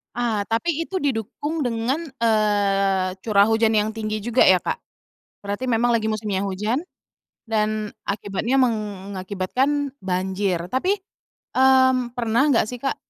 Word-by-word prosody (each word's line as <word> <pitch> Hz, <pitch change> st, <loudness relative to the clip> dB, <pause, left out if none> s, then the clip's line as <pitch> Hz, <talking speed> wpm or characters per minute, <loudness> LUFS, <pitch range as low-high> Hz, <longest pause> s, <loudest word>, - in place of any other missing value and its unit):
Ah 225 Hz, -4 st, 0 dB
tapi 225 Hz, +10 st, -1 dB, 0.2 s
itu 375 Hz, +1 st, -3 dB
didukung 285 Hz, +4 st, -2 dB
dengan, 245 Hz, +8 st, -1 dB, 0.2 s
eee, 200 Hz, -4 st, +2 dB
curah 205 Hz, -1 st, +4 dB
hujan 225 Hz, 0 st, +3 dB
yang 215 Hz, 0 st, +2 dB
tinggi 215 Hz, -1 st, -3 dB
juga 240 Hz, +3 st, +3 dB
ya, 185 Hz, -2 st, +5 dB
Kak? -, -, -2 dB, 0.6 s
Berarti 205 Hz, +4 st, -4 dB
memang 240 Hz, -1 st, +2 dB
lagi 220 Hz, -1 st, -1 dB
musimnya 205 Hz, -3 st, -2 dB
hujan 210 Hz, -, -1 dB, 0.7 s
dan 215 Hz, -1 st, 0 dB, 0.2 s
akibatnya 205 Hz, +6 st, 0 dB
mengakibatkan 210 Hz, +5 st, -1 dB, 0.2 s
banjir 190 Hz, 0 st, -1 dB
tapi, 370 Hz, -, 0 dB, 0.5 s
mmm, 260 Hz, -2 st, +4 dB
pernah 240 Hz, +4 st, +2 dB
enggak 265 Hz, -6 st, +4 dB
sih, 245 Hz, +2 st, -7 dB
Kak, 270 Hz, -, -1 dB
220 Hz, 130 wpm, -23 LUFS, 200-255 Hz, 0.7 s, ya